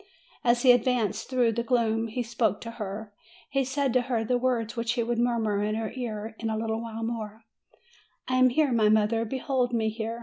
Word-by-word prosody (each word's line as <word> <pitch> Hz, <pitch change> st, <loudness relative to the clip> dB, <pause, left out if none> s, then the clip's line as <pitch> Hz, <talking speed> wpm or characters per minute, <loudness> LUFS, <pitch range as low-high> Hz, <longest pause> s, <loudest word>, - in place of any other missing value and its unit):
As 240 Hz, 0 st, +3 dB
he 250 Hz, -2 st, +8 dB
ad 245 Hz, -2 st, +2 dB
vanced 225 Hz, -4 st, 0 dB
through 250 Hz, -3 st, +2 dB
the 235 Hz, +1 st, -1 dB
gloom, 230 Hz, -2 st, +1 dB
he 245 Hz, +3 st, -3 dB
spoke 225 Hz, -3 st, 0 dB
to 230 Hz, -, -6 dB
her, 205 Hz, +1 st, -5 dB, 0.4 s
he 275 Hz, -1 st, +2 dB
said 265 Hz, 0 st, -1 dB
to 255 Hz, -, +4 dB
her 240 Hz, -3 st, -1 dB
the 245 Hz, +2 st, +1 dB
words 240 Hz, -3 st, 0 dB
which 230 Hz, 0 st, -1 dB
he 240 Hz, -1 st, 0 dB
would 235 Hz, 0 st, -1 dB
murmur 225 Hz, -4 st, +1 dB
in 215 Hz, +1 st, -1 dB
her 220 Hz, -1 st, -3 dB
ear 220 Hz, -3 st, -5 dB
in 225 Hz, -, -2 dB
a 220 Hz, -, -1 dB
little 225 Hz, 0 st, -2 dB
while 225 Hz, -1 st, -6 dB
more: 225 Hz, -1 st, -5 dB, 0.8 s
"I 255 Hz, -, +1 dB
am 255 Hz, 0 st, +6 dB
here, 285 Hz, +2 st, +2 dB
my 220 Hz, -3 st, +3 dB
mother; 220 Hz, +1 st, +2 dB
behold 255 Hz, 0 st, -1 dB
me 220 Hz, -2 st, +1 dB
here. 225 Hz, +1 st, -4 dB
230 Hz, 215 wpm, -27 LUFS, 220-245 Hz, 0.8 s, he